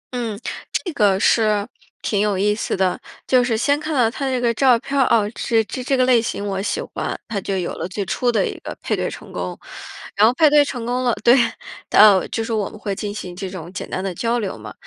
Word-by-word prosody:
嗯， 225 -4 -3 0.3
这 350 - -2
个 200 -6 +3
是， 210 -1 +2 0.4
挺 205 - 0
有 205 -2 +1
意 205 +2 +2
思 210 - -2
的。 185 -1 0 0.2
就 255 -1 +4
是 235 -2 0
先 285 +5 +1
看 310 0 -3
到 235 -4 +3
他 275 +3 -3
的 - - -1
这 255 - 0
个 240 -1 +1
照 250 0 +4
片 275 +4 -6
儿， - - +6
哦， 215 -3 +3
这 225 -1 +1
这- 255 - -6
这 270 +1 +1
个 255 - +3
类 250 -2 +4
型 215 -3 -4
我 195 -1 -2
喜 205 - -2
欢， - - -4
它 210 -3 -3
就 195 +1 -2
有 180 -2 -2
了 - - -4
最 195 +2 -4
初 245 +6 0
的 230 - +1
一 - - -5
个 - - -8
配 - - 0
对 - - -2
成 - - -10
功。 - - -4 0.6
然 210 - +6
后 230 - +4
配 310 +4 +5
对 295 0 +5
成 245 -5 -5
功 250 +1 -1
了 240 -2 +2
对， 240 +3 +6 0.5
到 205 -3 +6
就 225 - -2
是 225 0 -3
我 210 -2 -1
们 - - -12
会 205 -1 -3
进 205 0 -4
行 180 -4 -7
这 190 0 -5
种 175 -3 -8
简 - - -6
单 185 - -3
的 190 -2 -3
交 230 +6 0
流 200 -5 -3
嘛。 - - -9
225 Hz, 275 characters per minute, -21 LUFS, 200-245 Hz, 0.6 s, 儿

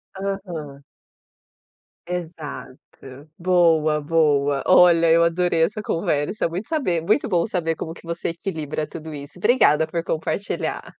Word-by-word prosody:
Aham. 175 -8 -5 1.3
Exato. 155 -4 -8
Boa, 165 -4 +3
boa. 145 -3 +2
Olha, 170 -2 +6
eu 170 0 +5
adorei 170 -1 +1
essa 210 +5 -1
conversa. 165 0 -1
Muito 180 +9 -6
saber 240 - 0
muito 210 - +1
bom 175 -5 +1
saber 170 -6 -2
como 160 +1 -6
que - - -16
você 170 0 -3
equilibra 160 -4 -4
tudo 160 -1 -8
isso. 145 +3 -10
Obrigada 180 - +4
por 165 +1 -3
compartilhar. 165 +5 -3
165 Hz, 125 wpm, -22 LUFS, 155-180 Hz, 1.3 s, Olha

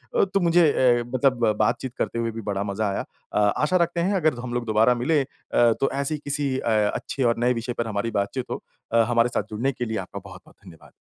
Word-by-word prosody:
अ, - - +4
तो 195 0 0
मुझे 170 -2 +4
ए 120 -2 +4
मतलब 130 -2 +2
बातचीत 115 +3 0
करते 115 - -2
हुए 115 0 -1
भी 115 +1 -6
बड़ा 100 -1 -2
मज़ा 100 +1 -2
आया। 100 - -3 0.3
अ, - - +2 0.2
आशा 150 +5 +1
रखते 170 0 0
हैं 195 +4 +1
अगर 155 -8 +1
हम 120 -1 -5
लोग 120 -1 -2
दोबारा 110 +2 +3
मिलें 140 +5 +1
अ, 120 -2 +1
तो 135 - +3
ऐसी 140 +2 -1
किसी 145 -2 -2
अ, 120 - -2 0.3
अच्छे 135 - -3
और 120 -1 +2
नए 125 +1 +3
विषय 120 +1 -4
पर 115 -1 -3
हमारी 110 +1 -2
बातचीत 105 +5 -2
हो। - - -4 0.3
अ, 115 - +5
हमारे 120 0 +3
साथ - - -1
जुड़ने 115 +6 -1
के 125 -2 -4
लिए 110 -1 -3
आपका - - -6
बहुत-बहुत - - -13
धन्यवाद। 80 - -15
120 Hz, 235 wpm, -24 LUFS, 115-140 Hz, 0.3 s, अ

